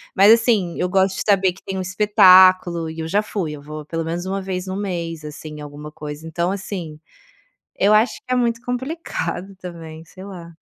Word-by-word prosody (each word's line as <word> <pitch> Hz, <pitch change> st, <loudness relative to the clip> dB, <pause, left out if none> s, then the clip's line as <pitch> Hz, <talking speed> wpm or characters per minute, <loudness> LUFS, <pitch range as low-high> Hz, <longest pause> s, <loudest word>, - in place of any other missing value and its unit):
Mas, 200 Hz, +3 st, +7 dB
assim. 220 Hz, -7 st, +3 dB
Eu 180 Hz, -, 0 dB
gosto 190 Hz, 0 st, +2 dB
de -, -, -3 dB
saber 195 Hz, -3 st, +3 dB
que 190 Hz, -, -19 dB
tem 190 Hz, -, -5 dB
um -, -, -1 dB
espetáculo, 185 Hz, -3 st, +5 dB
e 160 Hz, -, -9 dB
eu 160 Hz, -, -3 dB
já 205 Hz, +5 st, +1 dB
fui. 185 Hz, -8 st, -3 dB
Eu 145 Hz, -, -9 dB
vou 150 Hz, 0 st, -8 dB
pelo 165 Hz, 0 st, -3 dB
menos 170 Hz, +2 st, -3 dB
1 195 Hz, +1 st, -2 dB
vez 185 Hz, -1 st, -4 dB
no 185 Hz, -, -4 dB
mês, 170 Hz, -5 st, -4 dB
assim, 150 Hz, +1 st, -8 dB
em -, -, -9 dB
alguma 150 Hz, +1 st, -9 dB
coisa. 150 Hz, +1 st, -8 dB
Então, 170 Hz, +3 st, -1 dB
assim. 185 Hz, -6 st, -6 dB, 0.8 s
Eu 210 Hz, +2 st, +4 dB
acho 220 Hz, +3 st, +3 dB
que 255 Hz, -, -10 dB
é -, -, +3 dB
muito 235 Hz, -2 st, 0 dB
complicado, 245 Hz, -, -4 dB
também. 165 Hz, -3 st, -9 dB
Sei 185 Hz, +3 st, -13 dB
lá. 170 Hz, -4 st, -10 dB
185 Hz, 210 wpm, -21 LUFS, 165-200 Hz, 0.8 s, Mas